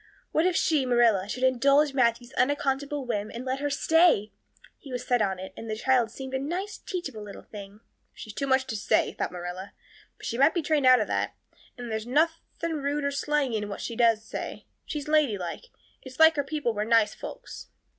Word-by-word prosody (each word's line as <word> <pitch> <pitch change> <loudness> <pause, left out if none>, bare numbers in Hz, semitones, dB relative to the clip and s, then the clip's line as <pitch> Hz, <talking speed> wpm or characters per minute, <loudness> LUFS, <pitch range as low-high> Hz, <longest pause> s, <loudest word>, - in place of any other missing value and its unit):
What 320 +3 +3
if 365 - 0
she, 310 -4 +2
Marilla, 235 -6 +3
should 255 +4 -4
indulge 275 +3 +4
Matthew's 240 0 +1
unaccountable 280 +1 0
whim 210 -3 -2
and 240 +2 -7
let 260 +1 -2
her 290 0 -1
stay? 305 - +3 0.5
He 275 - -12
was 250 -1 -4
set 245 -2 +2
on 195 -2 0
it; 190 +1 -8
and 225 - -8
the 215 - -1
child 245 0 +2
seemed 265 +3 -8
a 265 - 0
nice, 360 +9 -4
teachable 285 - -5
little 205 -1 -10
thing. 205 0 -11 0.3
"She's 215 - -9
got - - -29
too 275 - -1
much 265 0 +3
to 225 - -4
say," 205 - +1
thought - - -3
Marilla, 180 +2 -7 0.4
"but - - -11
she 235 - -3
might 290 +6 +5
be 340 - 0
trained 295 -3 +2
out 255 0 +7
of - - 0
that. - - -1 0.4
And 240 -2 -6
there's 220 +1 -3
nothing 325 +3 0
rude 285 +1 -2
or 280 - 0
slangy 280 -3 0
in 210 -1 -4
what 200 - -6
she 235 - -5
does 225 -2 +3
say. - - -6 0.2
She's 295 -2 -4
ladylike. 270 - 0 0.4
It's 260 0 -12
likely 320 -2 +6
her - - -10
people 295 -6 -1
were 210 0 -1
nice 225 -1 +3
folks." - - -9
260 Hz, 210 wpm, -27 LUFS, 220-290 Hz, 0.5 s, out